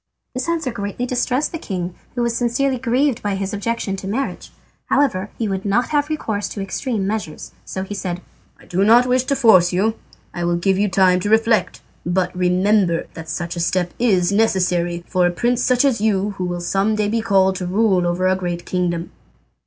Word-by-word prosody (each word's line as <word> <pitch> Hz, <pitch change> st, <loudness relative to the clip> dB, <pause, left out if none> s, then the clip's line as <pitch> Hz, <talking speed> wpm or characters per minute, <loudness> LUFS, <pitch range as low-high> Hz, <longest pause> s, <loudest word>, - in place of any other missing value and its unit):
This 255 Hz, +5 st, -3 dB
answer 325 Hz, -6 st, -1 dB
greatly 205 Hz, +2 st, -4 dB
distressed 250 Hz, +3 st, 0 dB
the 330 Hz, -, -5 dB
king, 180 Hz, -, -4 dB, 0.2 s
who 245 Hz, -, 0 dB
was 235 Hz, -1 st, 0 dB
sincerely 245 Hz, +2 st, 0 dB
grieved 255 Hz, +1 st, +1 dB
by 205 Hz, -1 st, -1 dB
his 195 Hz, +1 st, -3 dB
objection 205 Hz, -1 st, -2 dB
to 190 Hz, -, -7 dB
marriage. 250 Hz, +8 st, -3 dB, 0.4 s
However 210 Hz, -9 st, +1 dB
he 225 Hz, -, -1 dB
would 190 Hz, -1 st, -2 dB
not 205 Hz, +5 st, +1 dB
have 295 Hz, 0 st, +1 dB
recourse 220 Hz, -9 st, -2 dB
to -, -, -7 dB
extreme 200 Hz, +2 st, -2 dB
measures, 200 Hz, -6 st, -4 dB
so 190 Hz, -, -4 dB
he 195 Hz, -, -6 dB
said: 180 Hz, -3 st, -4 dB, 0.4 s
"I -, -, -18 dB
do 185 Hz, +2 st, 0 dB
not 235 Hz, +4 st, +6 dB
wish 250 Hz, 0 st, +1 dB
to 275 Hz, -, +1 dB
force 215 Hz, -9 st, +5 dB
you; 200 Hz, +5 st, +1 dB, 0.4 s
I 175 Hz, -, -4 dB
will 170 Hz, 0 st, +1 dB
give 190 Hz, +2 st, +1 dB
you 205 Hz, 0 st, +2 dB
time 185 Hz, -1 st, +4 dB
to 205 Hz, -, -2 dB
reflect, 220 Hz, -4 st, +2 dB, 0.2 s
but 180 Hz, +1 st, -1 dB
remember 180 Hz, 0 st, +2 dB
that 160 Hz, -1 st, -9 dB
such 170 Hz, +2 st, -4 dB
a -, -, -4 dB
step 175 Hz, +1 st, 0 dB
is 195 Hz, -7 st, +2 dB
necessary, 180 Hz, -5 st, +1 dB
for 180 Hz, -1 st, +2 dB
a -, -, 0 dB
prince 240 Hz, +6 st, 0 dB
such 250 Hz, +2 st, +3 dB
as 255 Hz, -7 st, +1 dB
you 205 Hz, -2 st, +1 dB
who 185 Hz, -2 st, -4 dB
will 175 Hz, -1 st, -3 dB
some 195 Hz, +4 st, +1 dB
day 210 Hz, -1 st, 0 dB
be 225 Hz, +2 st, 0 dB
called 190 Hz, -3 st, +2 dB
to 180 Hz, -, -4 dB
rule 190 Hz, -2 st, +2 dB
over 175 Hz, +2 st, 0 dB
a 185 Hz, -, +3 dB
great 175 Hz, -2 st, -4 dB
kingdom." 175 Hz, -2 st, -2 dB
200 Hz, 205 wpm, -20 LUFS, 180-235 Hz, 0.4 s, not